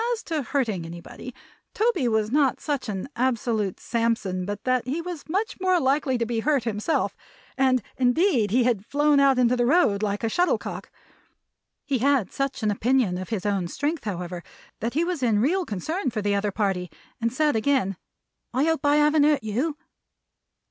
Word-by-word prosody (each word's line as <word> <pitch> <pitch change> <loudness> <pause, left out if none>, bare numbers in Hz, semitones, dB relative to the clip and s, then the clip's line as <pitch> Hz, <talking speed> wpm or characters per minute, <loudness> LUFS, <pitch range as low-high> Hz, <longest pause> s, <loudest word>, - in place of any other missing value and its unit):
As 460 - -5
to 320 -2 -2
hurting 235 -9 -1
anybody, 170 +9 -9 0.4
Toby 440 - +1
was 220 -1 +1
not 280 -1 +2
such 285 -6 -3
an 195 +1 -4
absolute 230 -5 0
Samson, 225 -6 -1
but 205 +1 -5
that 255 -2 +1
he 285 +6 -1
was 335 -3 -7
much 390 +3 -2
more 370 -1 +3
likely 270 -1 +1
to 235 - 0
be 230 0 -2
hurt 280 +1 +1
himself; 225 +7 -1 0.4
and 260 -3 +2
indeed 255 - +2
he 245 +5 +3
had 235 -5 +1
flown 290 +4 +2
out 275 -2 +4
into 250 0 +3
the 245 -1 +1
road 255 - +3
like 205 +1 -2
a - - +2
shuttle 350 +11 +2
cock. - - -7 1.0
He 275 -3 0
had 270 -5 +2
such 275 -3 -2
an 210 - +2
opinion 220 -3 +1
of 185 - -7
his 215 -4 -3
own 195 -4 0
strength, 290 - -3
however, 180 -3 -4 0.4
that 235 +3 -3
he 325 - +2
was 345 -4 -2
in 225 -4 +2
real 350 - +1
concern 275 - -2
for 215 -3 -4
the 205 0 +1
other 200 +1 0
party, 190 -4 -1 0.3
and 230 0 +1
said 295 +1 +1
again, 220 -4 +1 0.6
"I 265 - +3
hope 320 0 +1
I 290 0 +4
haven't 300 0 +4
hurt 300 -5 +2
you?" 260 +9 -1
250 Hz, 185 wpm, -25 LUFS, 210-290 Hz, 1.0 s, out